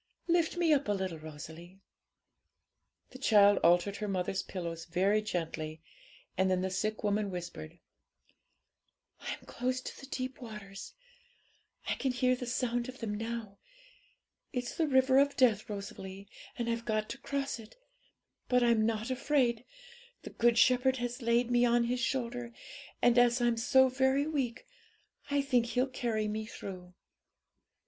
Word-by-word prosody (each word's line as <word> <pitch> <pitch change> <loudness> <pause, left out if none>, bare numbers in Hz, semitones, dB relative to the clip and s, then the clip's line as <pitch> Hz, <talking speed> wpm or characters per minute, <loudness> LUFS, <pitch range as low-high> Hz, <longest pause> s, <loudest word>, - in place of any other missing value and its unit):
Lift 340 0 +2
me 335 -3 +4
up 285 -4 +1
a 205 - +2
little, 190 -4 -3
Rosalie.' 160 +4 -10 1.3
The 260 - -11
child 205 -5 +5
altered 175 +4 +3
her 210 - -3
mother's 190 0 -1
pillows 170 -3 -6
very 195 +5 +2
gently, 160 -5 -4 0.6
and 190 +1 +2
then 185 -1 +1
the 190 0 -2
sick 215 +4 -2
woman 205 0 +1
whispered 175 - -7 1.4
'I'm - - -6
close 255 +1 -2
to - - -8
the 270 - -10
deep 255 0 -5
waters; 210 -4 -9 0.9
I - - +1
can 265 - -1
hear 255 0 +2
the 250 -1 -6
sound 245 0 -1
of 255 - -9
them 225 -4 -4
now. 225 -2 -5 0.9
It's 250 -3 -3
the 320 - +1
river 260 -1 +5
of 280 0 +2
death, 225 -6 +3
Rosalie, 200 -1 -7 0.3
and 235 -2 -2
I've 230 0 -2
got 215 -1 0
to 270 - -6
cross 275 -2 -3
it, 220 - -13 0.7
but 250 -1 +4
I'm 230 -2 +3
not 225 +2 -2
afraid: 255 -3 +1 0.6
the - - -8
Good 235 0 +3
Shepherd 255 +2 +4
has 245 +1 -4
laid 235 +1 +2
me 240 0 +4
on 240 0 +4
His 245 +1 -1
shoulder, 245 -1 -2 0.5
and, 245 0 +6
as 245 0 +4
I'm 240 -1 +2
so 260 +3 +4
very 265 +2 +2
weak, 270 -7 -2 0.6
I 285 -1 +1
think 250 -4 +2
He'll 250 +2 +1
carry 235 -5 -2
me 215 +1 -3
through.' 180 -4 -9
235 Hz, 155 wpm, -31 LUFS, 200-255 Hz, 1.4 s, and